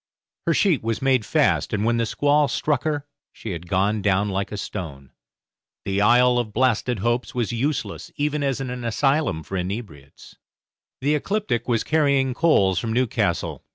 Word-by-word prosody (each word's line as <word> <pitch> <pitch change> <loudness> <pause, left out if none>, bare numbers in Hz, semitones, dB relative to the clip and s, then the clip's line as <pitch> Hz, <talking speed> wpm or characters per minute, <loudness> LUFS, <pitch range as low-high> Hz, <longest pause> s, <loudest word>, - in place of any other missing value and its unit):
Her - - +3
sheet 180 - +2
was 115 -1 -2
made 130 -5 +1
fast, - - +1
and 105 0 0
when 120 0 +2
the 115 -1 0
squall 145 +4 +2
struck 145 -1 -1
her 145 -2 -1 0.3
she 110 - -7
had 85 -1 -7
gone 100 +3 +1
down 100 +1 +1
like 95 0 -2
a 105 - -4
stone. 75 -10 -7 0.7
The 100 +1 0
Isle 125 +3 +5
of 110 -3 -4
Blasted 125 -2 +1
Hopes 120 +3 -1
was 120 -1 -1
useless 135 +6 -3
even 150 0 -1
as 135 -2 0
an 125 -2 -5
asylum 135 - 0
for 95 - -5
inebriates. 90 - -7 0.6
The 145 +3 +2
'Ecliptic' 150 - -1
was 115 -3 +1
carrying 140 -4 +2
coals 100 - +3
from 115 +3 -3
Newcastle. 125 -1 -1
120 Hz, 165 wpm, -23 LUFS, 100-140 Hz, 0.7 s, Isle